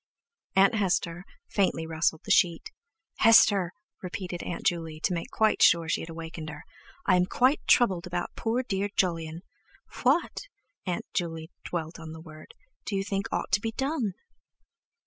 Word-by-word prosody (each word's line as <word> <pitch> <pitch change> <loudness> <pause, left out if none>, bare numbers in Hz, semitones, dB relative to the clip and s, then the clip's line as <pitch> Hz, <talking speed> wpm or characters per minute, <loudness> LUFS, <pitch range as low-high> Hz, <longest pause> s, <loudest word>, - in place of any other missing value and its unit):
Aunt 195 +4 +5
Hester 180 -4 0 0.2
faintly 185 -5 0
rustled 160 0 0
the - - -2
sheet. 170 -2 +3 0.5
"Hester," 205 -5 +6 0.3
repeated 180 -1 -5
Aunt 175 - -5
Juley, 165 -2 -1
to 180 - +1
make 170 -1 -4
quite 220 -1 +2
sure 170 -1 +6
that 155 - -2
she - - 0
had 165 - -7
awakened 165 -1 -7
her, 150 0 -9 0.4
"I 185 - +4
am 180 0 +2
quite 255 +8 +3
troubled 190 -8 +4
about 175 0 -4
poor 235 +3 -1
dear 200 -3 -1
Jolyon. 165 -3 -1 0.6
What," 275 +7 +2 0.5
Aunt 180 - -2
Juley 165 -1 -3
dwelt 165 -1 -4
on 160 -1 -8
the 160 - -9
word, 155 -1 -13 0.3
"do 205 - -3
you 195 - 0
think 200 +2 -2
ought - - -2
to 190 +2 +3
be 225 -1 -3
done?" 265 - -1
180 Hz, 165 wpm, -28 LUFS, 165-205 Hz, 0.6 s, Hester